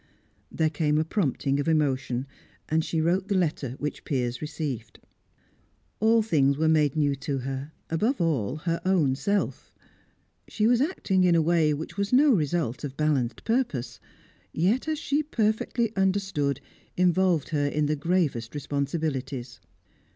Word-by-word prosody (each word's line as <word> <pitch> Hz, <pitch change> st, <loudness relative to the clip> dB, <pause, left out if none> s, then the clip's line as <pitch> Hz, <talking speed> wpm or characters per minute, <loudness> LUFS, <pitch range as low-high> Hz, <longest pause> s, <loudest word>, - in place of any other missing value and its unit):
There 160 Hz, -1 st, +1 dB
came 150 Hz, -1 st, +1 dB
a 155 Hz, -, +1 dB
prompting 145 Hz, -, 0 dB
of 145 Hz, -, -2 dB
emotion, 135 Hz, -5 st, +1 dB, 0.4 s
and 160 Hz, +1 st, +1 dB
she 165 Hz, -, -2 dB
wrote 180 Hz, +4 st, +1 dB
the 200 Hz, -2 st, +1 dB
letter 150 Hz, -7 st, -1 dB
which 150 Hz, -, -4 dB
Piers 125 Hz, -3 st, -2 dB
received. 150 Hz, -5 st, -5 dB, 1.0 s
All 225 Hz, +1 st, +4 dB
things 140 Hz, -9 st, +2 dB
were 160 Hz, +1 st, +2 dB
made 155 Hz, -3 st, +3 dB
new 145 Hz, -2 st, +2 dB
to 140 Hz, 0 st, -3 dB
her; 135 Hz, +3 st, -5 dB, 0.2 s
above 215 Hz, -, 0 dB
all, 150 Hz, -, 0 dB
her 165 Hz, +2 st, -2 dB
own 175 Hz, -8 st, +2 dB
self. 200 Hz, +9 st, -2 dB, 0.8 s
She 215 Hz, -, -1 dB
was 240 Hz, +2 st, +4 dB
acting 210 Hz, -, +1 dB
in 175 Hz, -2 st, +4 dB
a 165 Hz, -, +4 dB
way 165 Hz, -2 st, +3 dB
which 155 Hz, +6 st, -5 dB
was 200 Hz, 0 st, -1 dB
no 280 Hz, +3 st, +6 dB
result 155 Hz, -, 0 dB
of 140 Hz, -1 st, -6 dB
balanced 140 Hz, -6 st, 0 dB
purpose, 225 Hz, -, -1 dB, 0.5 s
yet, 205 Hz, -, +1 dB
as 310 Hz, -1 st, 0 dB
she 295 Hz, -1 st, 0 dB
perfectly 225 Hz, -3 st, 0 dB
understood, 190 Hz, -7 st, 0 dB, 0.4 s
involved 180 Hz, -3 st, +2 dB
her 145 Hz, -3 st, 0 dB
in 150 Hz, +1 st, 0 dB
the 150 Hz, +1 st, +1 dB
gravest 150 Hz, -7 st, -1 dB
responsibilities. 140 Hz, -3 st, -3 dB
155 Hz, 150 wpm, -26 LUFS, 140-190 Hz, 1.0 s, no